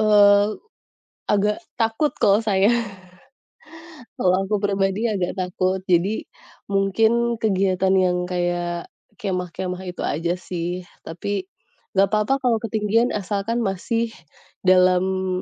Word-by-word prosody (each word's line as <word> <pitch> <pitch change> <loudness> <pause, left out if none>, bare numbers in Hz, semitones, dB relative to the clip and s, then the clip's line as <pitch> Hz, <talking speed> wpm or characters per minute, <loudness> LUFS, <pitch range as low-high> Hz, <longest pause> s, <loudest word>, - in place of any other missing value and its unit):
eee, 205 -1 +5 0.7
agak 210 0 +1 0.2
takut 225 +7 +1
kalau 200 +2 +4
saya. 200 -2 +3 1.5
Kalau 185 0 +3
aku 210 +2 0
pribadi 200 +2 +1
agak 185 -4 -1
takut. 185 +1 -1
Jadi, 180 +5 +1 0.5
mungkin 225 +4 +2
kegiatan 190 -2 +1
yang 180 -1 +2
kayak 175 -1 -2 0.3
kemah-kemah 180 -1 -3
itu 175 - -7
aja 170 +4 -1
sih. 175 0 -4 0.2
Tapi, 190 +4 -4 0.5
enggak 195 0 +5
apa-apa 215 +5 +2
kalau 240 -2 +3
ketinggian 225 +2 +1
asalkan 205 +3 -2
masih 225 +4 -1 0.5
dalam, 185 0 +3
195 Hz, 105 wpm, -22 LUFS, 180-210 Hz, 1.5 s, eee